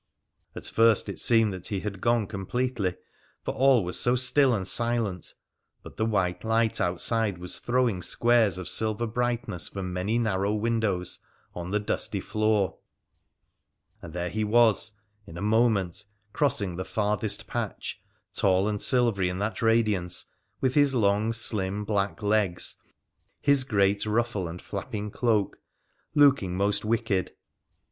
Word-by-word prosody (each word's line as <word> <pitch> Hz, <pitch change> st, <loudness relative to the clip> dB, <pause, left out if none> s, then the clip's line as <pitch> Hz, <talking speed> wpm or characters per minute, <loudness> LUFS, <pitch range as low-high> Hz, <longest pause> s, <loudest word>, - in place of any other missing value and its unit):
At -, -, -6 dB
first 115 Hz, -2 st, +3 dB
it 100 Hz, -, -5 dB
seemed 115 Hz, -3 st, +3 dB
that 90 Hz, -1 st, -6 dB
he 100 Hz, -3 st, -3 dB
had 100 Hz, -3 st, -6 dB
gone 120 Hz, -2 st, +2 dB
completely, 100 Hz, 0 st, -2 dB, 0.5 s
for -, -, -2 dB
all 130 Hz, -4 st, +4 dB
was 90 Hz, +1 st, -3 dB
so 120 Hz, +1 st, +2 dB
still 130 Hz, +2 st, +3 dB
and 95 Hz, -3 st, -3 dB
silent; 115 Hz, -6 st, -1 dB, 0.5 s
but -, -, -12 dB
the 110 Hz, -, 0 dB
white 90 Hz, -5 st, -1 dB
light 110 Hz, -1 st, +1 dB
outside 100 Hz, +3 st, 0 dB
was 90 Hz, 0 st, -6 dB
throwing 120 Hz, -6 st, 0 dB
squares 115 Hz, -2 st, +2 dB
of 95 Hz, -2 st, -6 dB
silver 110 Hz, +1 st, +2 dB
brightness 120 Hz, -5 st, -1 dB
from 95 Hz, -2 st, -5 dB
many 95 Hz, +6 st, -1 dB
narrow 105 Hz, -3 st, 0 dB
windows 105 Hz, -5 st, -1 dB, 0.3 s
on 90 Hz, 0 st, -6 dB
the 105 Hz, +2 st, 0 dB
dusty 105 Hz, -1 st, -1 dB
floor 110 Hz, -1 st, 0 dB, 0.6 s
— -, -, -46 dB
and 85 Hz, -, -9 dB
there 90 Hz, 0 st, -3 dB
he 110 Hz, 0 st, -1 dB
was, 110 Hz, -1 st, +3 dB, 0.3 s
in 85 Hz, -, -10 dB
a -, -, -6 dB
moment, 110 Hz, -4 st, +1 dB, 0.3 s
crossing 105 Hz, -, 0 dB
the 95 Hz, -, -3 dB
farthest 105 Hz, 0 st, 0 dB
patch, -, -, -5 dB, 0.3 s
tall 95 Hz, 0 st, +2 dB
and 105 Hz, -1 st, -2 dB
silvery 115 Hz, -8 st, +3 dB
in 90 Hz, -, -4 dB
that 105 Hz, +3 st, -3 dB
radiance, 105 Hz, -6 st, +1 dB, 0.4 s
with 130 Hz, -1 st, +1 dB
his 145 Hz, -2 st, +3 dB
long, 105 Hz, 0 st, +2 dB
slim 105 Hz, -3 st, 0 dB
black 100 Hz, 0 st, -1 dB
leg3, 105 Hz, -4 st, 0 dB, 0.6 s
his 140 Hz, -2 st, +3 dB
great 100 Hz, -4 st, +1 dB
ruffle, 110 Hz, -4 st, -1 dB
and 85 Hz, +2 st, -8 dB
flapping 105 Hz, 0 st, -5 dB
cloak 110 Hz, -4 st, 0 dB, 0.3 s
— -, -, -43 dB
looking 140 Hz, -11 st, +4 dB
most 100 Hz, +1 st, 0 dB
wicked. 110 Hz, -4 st, -1 dB
105 Hz, 150 wpm, -26 LUFS, 95-115 Hz, 0.6 s, all